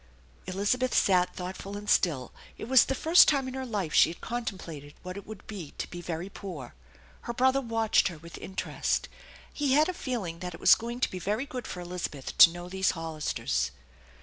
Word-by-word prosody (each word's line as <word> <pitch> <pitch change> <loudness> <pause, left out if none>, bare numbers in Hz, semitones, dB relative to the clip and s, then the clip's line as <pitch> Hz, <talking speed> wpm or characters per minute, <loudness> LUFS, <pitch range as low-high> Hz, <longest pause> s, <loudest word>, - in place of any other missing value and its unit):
Elizabeth 205 +7 0
sat 180 -2 +3
thoughtful 190 +2 -6
and 205 0 -9
still. 140 - +2 0.3
It - - -7
was 260 -1 +6
the 270 - -1
first 325 +5 +6
time 275 -3 +2
ID 260 - -5
her 265 0 -3
life 200 -9 -2
she - - +6
had 170 - -8
contemplated 180 - -6
what 185 0 -6
it 200 - -9
would 215 -2 -10
be 185 -9 -8
to - - -3
be 175 - -6
very 170 +1 -4
poor. 180 -10 -8 0.6
Her - - -1
brother 260 +3 +3
watched 225 -3 +2
her 175 -4 -6
with 170 +2 -11
interest. 190 - -2 0.4
He 285 -3 +1
had 300 +2 +5
a - - -1
feeling 215 - -4
that 180 -1 -5
it - - -12
was - - +7
going 235 +2 -2
to - - +1
be 185 - -5
very 210 +8 -1
good 250 -4 -6
for 180 - -6
Elizabeth 175 -6 -5
to - - +11
know 175 +1 -8
these 190 +1 +1
Hollisters. 155 - -2
190 Hz, 200 wpm, -28 LUFS, 175-240 Hz, 0.6 s, to